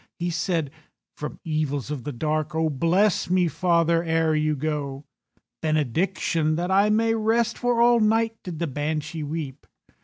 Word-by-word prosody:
He 175 0 -2
said, 165 -4 -1 0.4
"From 150 - -6
evils 150 -3 -2
of 140 -4 -5
the 145 - -3
dark 155 +4 -2
Oh, 160 -1 +1
bless 175 +9 +2
me, 180 -1 +3
father, 170 +1 +2
ere 160 -1 +1
you 155 0 +1
go. 145 -1 -3 0.6
"Benediction, 155 +1 0
that 175 +3 -2
I 200 +2 +4
may 225 +1 +2
rest, 225 +1 +1
For 245 -1 0
all 240 0 +5
night 225 +1 +2
did 175 -3 -7
the 170 - -1
Banshee 155 +2 -3
weep." 145 -2 -5
160 Hz, 155 wpm, -24 LUFS, 150-190 Hz, 0.6 s, all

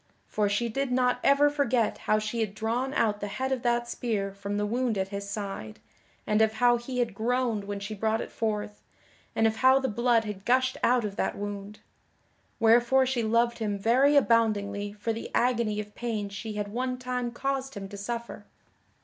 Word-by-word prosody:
For 210 -1 0
she 205 +4 0
did 270 +3 -2
not 250 0 +2
ever 280 +1 +5
forget 260 -6 +1
how 215 - +5
she 215 +2 -3
had 215 -2 -2
drawn 235 +5 -1
out 210 -2 +1
the 205 - -2
head 260 +6 -3
of 260 -2 0
that 240 0 +1
spear 210 -5 -2
from 200 +1 -4
the 205 - 0
wound 235 0 0
at 190 0 -1
his 200 0 -5
side, 195 - -5 0.5
and 210 +1 +2
of 220 0 +3
how 240 +2 +4
he 250 +2 -6
had 240 -3 0
groaned 230 -1 0
when 200 0 -4
she 205 +2 -5
brought 220 +2 0
it - - -6
forth, 210 -2 -3 0.5
and 225 - +3
of 220 0 +1
how 260 +2 +6
the 265 - -1
blood 235 +1 +2
had 210 -3 -6
gushed 260 +2 +2
out 245 -2 +3
of 200 -1 -5
that - - -1
wound. 205 0 -6 0.8
Wherefore 240 +3 +5
she 255 -2 0
loved 235 +2 +1
him 210 -2 -1
very 255 +8 +4
aboundingly 205 -5 +2
for 210 +2 -2
the 225 - -6
agony 235 -3 +1
of 210 0 -6
pain 220 -4 -3
she 215 +2 -6
had 205 -1 -3
one 250 +3 -2
time 250 -1 -3
caused 270 +1 -3
him 195 -1 -6
to 205 - -9
suffer. 230 0 -6
225 Hz, 200 wpm, -28 LUFS, 205-245 Hz, 0.8 s, how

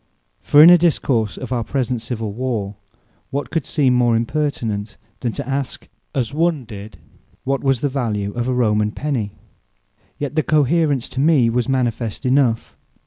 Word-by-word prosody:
For 145 +1 +6
in 170 - +10
a 175 - +7
Discourse 130 - +1
of - - -7
our 120 -2 0
present 125 -1 -2
civill 115 -3 -4
warre, 110 -4 -3 0.6
what 140 +1 -4
could 160 -5 -2
seem 135 -5 +2
more 120 -2 +3
impertinent, 115 -5 -2 0.2
than 120 - -2
to - - -5
ask 135 -1 -3 0.3
(as 130 -1 -1
one 160 -4 0
did) 105 -3 -10 0.5
what 135 0 -1
was 135 -3 +1
the 145 - +1
value 110 -7 -2
of 120 0 -2
a 130 - 0
Roman 105 -3 +2
Penny? 120 -7 -3 0.8
Yet 145 +1 -4
the 155 - +3
Cohaerence 150 -3 +1
to 130 - -5
me 140 -6 +4
was 125 +2 -1
manifest 120 -4 -1
enough. 125 -3 +1
125 Hz, 165 wpm, -20 LUFS, 115-140 Hz, 0.8 s, in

